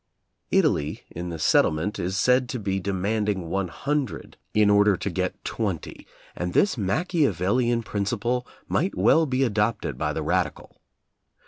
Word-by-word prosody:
Italy 75 +1 +1
in 85 +1 -5
the 85 - -5
settlement 80 +5 +2
is 95 +3 -2
said 125 +3 +3
to 125 - -3
be 95 -2 -1
de 100 +2 -3
manding 100 -2 -1
one 95 -1 0
hundred 140 - -3 0.2
in 105 -1 +4
order 105 -1 +4
to - - -3
get - - -3
twenty, - - -4 0.3
and 90 0 -3
this 200 - +3
Machiavellian 120 - +1
principle 120 +5 -2 0.2
might 185 +6 0
well 160 -1 +4
be 130 0 +1
adopted 110 -2 0
by - - 0
the - - -3
radical. - - -2
105 Hz, 145 wpm, -25 LUFS, 95-125 Hz, 0.3 s, in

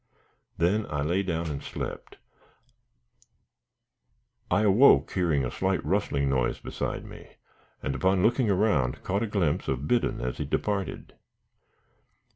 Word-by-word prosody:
Then 100 +6 +1
I 75 -1 -2
lay 85 +6 +1
down 85 -4 -2
and 70 - -5
slept. - - -7 2.3
I 105 - +2
awoke, 110 +7 +5
hearing 80 -7 +1
a 60 - -4
slight 95 -3 -1
rustling 75 -6 0
noise 65 -2 0
beside - - -4
me, - - -12 0.5
and, 70 - -1
upon 95 +7 +1
looking 120 0 +2
around, 90 - +1
caught 100 +2 -1
a 115 - 0
glimpse 95 -8 0
of 65 +2 -2
Biddon 120 -1 +1
as 60 0 -4
he - - -2
departed. 100 -2 -3
90 Hz, 130 wpm, -27 LUFS, 70-100 Hz, 2.3 s, awoke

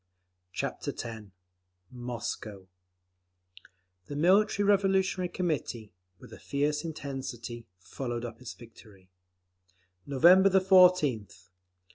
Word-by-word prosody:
Chapter - - -4
X 110 -3 -6 0.7
Moscow 120 -5 -6 1.4
The 145 - -6
Military 200 +5 +3
Revolutionary 190 -2 +2
Committee, 150 - -3 0.2
with 110 - -15
a - - -11
fierce 150 +1 -1
intensity, 130 -7 -7
followed 120 +5 -5
up 115 0 -9
its 125 - -8
victory: 105 -5 -17 1.0
November 175 +8 +6
14th. 180 - +3
135 Hz, 85 wpm, -29 LUFS, 115-180 Hz, 1.4 s, November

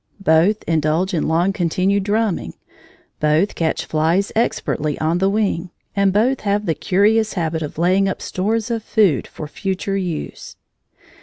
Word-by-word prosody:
Both 180 +3 +3
indulge 160 +4 0
in 165 - 0
long 170 +5 +2
continued 185 +3 +1
drumming; 205 - -1 0.6
both 155 +6 +2
catch 160 -1 -1
flies 165 +6 +1
expertly 155 -9 -1
on 165 +3 0
the 190 +1 +2
wing; 195 -4 -1 0.3
and 200 -1 +3
both 240 +7 +2
have 205 0 0
the 165 - +1
curious 210 +7 +2
habit 160 -3 -2
of 150 -1 -6
laying 185 +4 +2
up - - -4
stores 215 +5 -2
of 230 -1 -1
food 205 - +2
for 155 - -8
future 195 +4 -3
use. 175 -5 -5
190 Hz, 150 wpm, -20 LUFS, 160-205 Hz, 0.6 s, Both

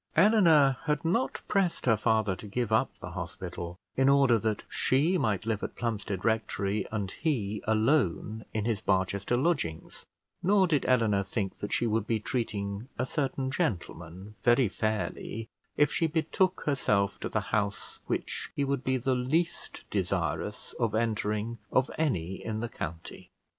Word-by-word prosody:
Eleanor 165 - +6
had 150 +1 0
not 135 -6 0
pressed 195 -4 +1
her 115 -3 +5
father 110 -2 +1
to 105 - -10
give 115 +2 -2
up 110 - +3
the - - -8
hospital 85 +1 -6 0.2
in 135 +1 +4
order 135 -4 +5
that 110 -1 -1
she 150 +8 +2
might 110 - 0
live 110 -2 -1
at - - -5
Plumstead 105 -5 -3
Rectory 110 -2 0
and 100 -3 -2
he 110 -10 -1
alone 110 - +1
in 110 -1 -2
his 110 -3 0
Barchester 100 +4 +1
lodgings; 135 - -1 0.3
nor 195 +1 +4
did 155 -5 +1
Eleanor 115 -6 +3
think 100 0 -3
that 105 - -5
she - - +1
would 110 -1 0
be 115 -2 +1
treating 105 -2 -3
a 125 - 0
certain 135 -2 -2
gentleman 95 - -3
very 120 0 +4
fairly, 110 +1 -3 0.3
if 145 0 +4
she 165 - +2
betook 165 +4 +1
herself 105 -9 +1
to - - -3
the - - 0
house 100 -1 -1
which - - -3
he 140 - +1
would 140 -2 -1
be 130 0 +1
the 130 +2 0
least 140 +7 -1
desirous - - -2
of 115 -3 +1
entering 110 0 -1
of 130 +1 +2
any 95 - -1
in 110 -1 -3
the 120 +1 -3
county. 80 -4 -7
115 Hz, 160 wpm, -29 LUFS, 105-135 Hz, 0.3 s, Eleanor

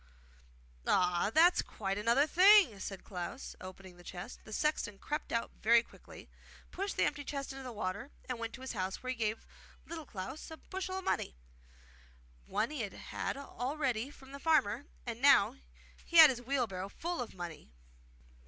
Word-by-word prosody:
'Ah, 180 +1 +3
that's 340 +7 +6
quite 195 -2 -3
another 235 +7 +3
thing!' 365 - +6
said 195 0 -5
Little - - -24
Klaus, 185 +8 -5
opening 185 -1 -10
the 175 - -14
chest. 175 0 -8
The 220 - -11
sexton 225 -5 0
crept 300 +8 -4
out 230 0 -1
very 235 +1 +6
quickly, - - -14 0.4
pushed 395 +2 -3
the - - +3
empty 290 0 -2
chest 275 -1 -4
into 270 - -8
the 255 -1 -6
water 205 +3 -4 0.2
and 255 -2 -3
went 230 0 -4
to 255 - -9
his 260 - -4
house, 190 -1 -3
where 255 - -2
he - - -3
gave 220 -1 -2 0.4
Little 325 -2 -7
Klaus 240 +9 -6
a 320 - -8
bushel 375 +1 -5
of 380 - -5
money. 65 - -1 1.1
One 225 +6 0
he 300 -5 -3
had 205 -3 -4
had - - -4
already 270 -2 -2
from 270 -2 -15
the 280 - -8
farmer, 285 -4 +2 0.2
and 235 -1 -5
now 275 -3 +6 0.5
he 340 - 0
had 315 -3 +11
his 245 -2 -5
wheelbarrow 230 -8 -1
full 340 +5 -3
of 240 - -6
money. 170 -4 -7
245 Hz, 180 wpm, -33 LUFS, 205-290 Hz, 1.1 s, had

